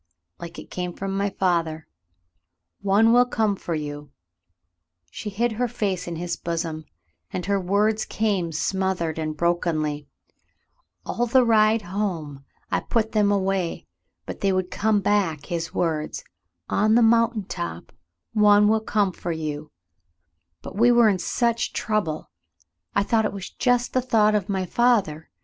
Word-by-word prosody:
"Like 170 0 -8
it - - -10
came 180 -1 -4
from 195 +1 -4
my 200 +1 0
father: 165 -4 -1 0.9
*One 205 +4 +4
will 245 0 +5
come 220 -4 +1
for 170 -3 -4
you.' 145 -1 -6 0.5
" 85 0 -47
She 210 - -6
hid 230 +4 0
her 245 +3 -1
face 200 -6 -2
in 170 - -4
his 170 +1 -3
bosom, 165 -2 -4 0.5
and 180 - -4
her 200 0 +1
words 210 +4 +1
came 200 -6 -1
smothered 170 -1 -1
and 155 -1 -3
brokenly, 155 -3 0 1.0
"All 240 +1 -1
the 255 +1 +4
ride 220 -1 +4
home 170 -8 -4 0.3
I - - +2
put 220 -2 -1
them 210 -2 +3
away, 195 -3 -1 0.4
but - - -7
they 195 - +2
would 185 -1 -1
come 215 -1 +1
back, 185 -8 0
his 170 -2 -3
words: 155 -3 -2 0.4
*0n 215 +2 +2
the 240 - +5
mountain 230 -1 +3
top, 170 - -6 0.4
one 210 -1 +5
will 220 +1 +3
come 210 -3 +1
for 175 - -5
you 155 -2 -4 0.4
'; 85 -1 -52
but - - -8
we 235 +4 +5
were 235 -2 +6
in 190 -3 0
such 235 +4 0
trouble 190 -8 -2 0.3
— 90 +1 -46
I 200 - +3
thought 220 +1 +2
it - - -2
was 195 -2 -7
just 245 -1 +1
the 255 - +2
thought 220 -4 +3
of 210 -1 0
my 190 -2 -1
father. 195 -8 +1
195 Hz, 160 wpm, -24 LUFS, 160-215 Hz, 1.0 s, were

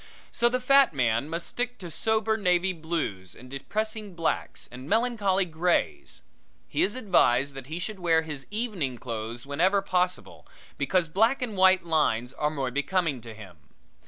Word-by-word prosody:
So 235 0 +3
the 255 +1 0
fat 275 - +4
man 120 +2 +1
must 165 +1 -3
stick 245 0 -3
to 175 -3 -8
sober 220 +3 +1
navy 185 -2 +2
blues 155 - -4
and 125 +1 -13
depressing 215 +7 -4
blacks 165 -1 -2
and 130 +4 -9
melancholy 215 -5 +2
grays. 170 +1 -1 0.4
He - - -1
is 365 - +2
advised 140 - +2
that 135 -1 -8
he 160 +3 -5
should 195 +3 -5
wear 165 -2 +3
his 150 -4 -7
evening 205 - -3
clothes 115 +1 -5
whenever 175 +8 +2
possible, 180 -1 -2 0.3
because 180 -3 +1
black 225 - +2
and 225 -4 -4
white 185 -1 +5
lines 140 -7 +1
are 150 - 0
more 135 -4 -3
becoming 145 0 0
to 115 -1 -10
him. 95 -6 -12
170 Hz, 160 wpm, -27 LUFS, 135-210 Hz, 0.4 s, white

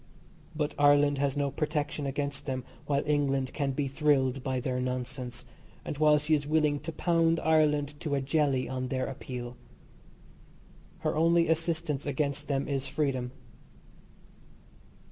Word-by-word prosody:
But 150 -1 -1
Ireland 145 0 +5
has 140 0 0
no 140 -1 0
protection 150 -1 -2
against 140 +1 -3
them 130 -2 -2 0.2
while 140 -1 +1
England 135 -3 +1
can 140 -2 -1
be 140 +1 -1
thrilled 135 -2 +2
by 130 0 -1
their 125 0 -2
nonsense, 125 -1 -4 0.4
and 145 - -5
while 150 -1 +6
she 150 +2 0
is 145 -1 +1
willing 150 -1 +2
to 165 - -5
pound 165 0 +2
Ireland 150 -2 +2
to 150 -4 -1
a - - +1
jelly 135 -1 +1
on 130 0 -3
their 130 0 -1
appeal. 125 -2 -6 1.4
Her - - 0
only 165 +2 +4
assistance 160 -3 -1
against 145 +1 -1
them 140 -1 -1
is 135 -1 -2
freedom. 135 -3 -1
145 Hz, 145 wpm, -29 LUFS, 135-150 Hz, 1.4 s, while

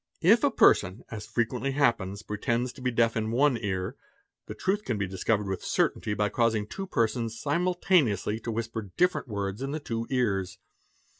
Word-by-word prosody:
If - - +6
a - - +5
person, 95 +6 +3
as 110 -2 -6
frequently 125 +3 -1
happens, 110 -8 +1
pretends 120 +4 -1
to 130 - -13
be 125 - 0
deaf 115 -1 +2
in 110 -1 -1
one 135 +4 +3
ear, 95 -3 -3 0.5
the - - -6
truth 200 +3 -1
can 120 -4 -2
be 100 - 0
discovered 100 +3 0
with 95 -1 -3
certainty 105 - 0
by 105 0 +1
causing 115 -1 +1
two 195 - -6
persons 115 - -1
simultane 175 - +2
ously 105 +2 -3
to 115 - -4
whisper 115 -2 -4
different 180 -5 +2
words 100 0 -3
in 135 - -2
the 155 - -2
two 115 -5 -4
ears. 100 -9 0
115 Hz, 180 wpm, -28 LUFS, 105-130 Hz, 0.5 s, If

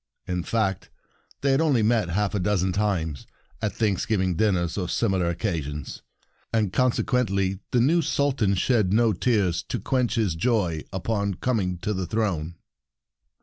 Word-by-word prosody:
In 90 -1 -2
fact, 95 -1 -1 0.5
they 140 - +2
had 135 - +3
met - - +3
only 135 -8 +3 0.3
half 105 0 0
a 105 - 0
dozen 95 0 +1
times, 90 -7 -1 0.3
at 105 -2 0
Thanksgiving 95 -3 0
dinners 90 -4 +1
or 90 -3 -2
similar 95 -6 +1
occasions; 80 -6 -3 0.5
and 105 -5 0
consequently 100 -6 +1
the 120 - +2
new 165 +7 +4
Sul 145 -2 +1
tan 105 -7 +1
shed 105 -1 +2
no 110 +1 +3
tears 100 -9 +1
to - - -2
quench 125 -2 0
his 110 -7 +1
joy 85 -4 0
upon 100 +1 -1
coming 95 -5 -1
to 105 - 0
the 95 -2 -3
throne. 85 -6 -1
100 Hz, 150 wpm, -25 LUFS, 90-115 Hz, 0.5 s, new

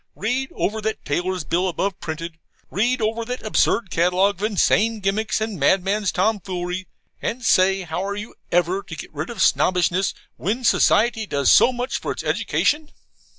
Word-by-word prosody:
read 250 +5 -1
over 220 +2 -1
that 220 +1 -3
tailor's 180 +4 -1
bill 180 +5 0
above 190 +2 -2
printed, 160 +1 -6 0.3
read 240 +6 +1
over 225 +2 -1
that 250 +2 -5
absurd 215 -1 +1
catalogue 180 +3 +2
of - - -4
insane 215 +1 +2
gimcracks 210 +3 0
and 215 -4 -3
madman's 195 +7 +2
tomfoolery 185 -2 -2 0.3
and 250 +2 -3
say 190 0 +4
how 175 +2 -3
are 200 +1 -3
you 210 +2 -7 0.2
ever 175 +3 +2
to 160 - -9
get 155 - -9
rid 155 +2 -4
of 230 -5 -1
Snobbishness 180 +1 +2 0.2
when 220 +8 -2
society 225 -1 +3
does 140 -5 +2
so 255 - +6
much 250 +1 -3
for - - -3
its - - -5
education? 300 +1 0
195 Hz, 165 wpm, -22 LUFS, 180-220 Hz, 0.3 s, so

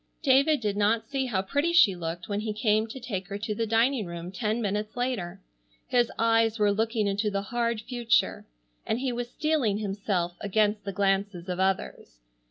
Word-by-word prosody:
David 280 +1 +4
did 205 -2 -1
not 215 +2 +2
see 270 -2 -1
how 190 -6 0
pretty 285 - 0
she 220 - +6
looked 170 0 -5
when 205 -1 -2
he 215 0 -3
came 215 +1 +1
to 245 +4 -8
take 200 -7 -4
her 200 0 -4
to 215 +1 -3
the 225 +2 -2
dining 225 0 +2
room 170 +1 -6
ten 215 +3 -1
minutes 210 +1 -2
later. 245 -9 -2 0.5
His 240 -2 +2
eyes 225 0 +3
were 210 -1 +3
looking 220 +1 0
into 200 +2 0
the 200 -1 -2
hard 235 +1 -1
future, 240 -1 0 0.4
and 220 - -1
he 255 0 -1
was 240 0 -4
steeling 280 -8 0
himself 195 -4 -2
against 210 0 +1
the 200 - -2
glances 195 -2 0
of 180 0 -3
others. 190 - -2
215 Hz, 185 wpm, -27 LUFS, 200-240 Hz, 0.5 s, she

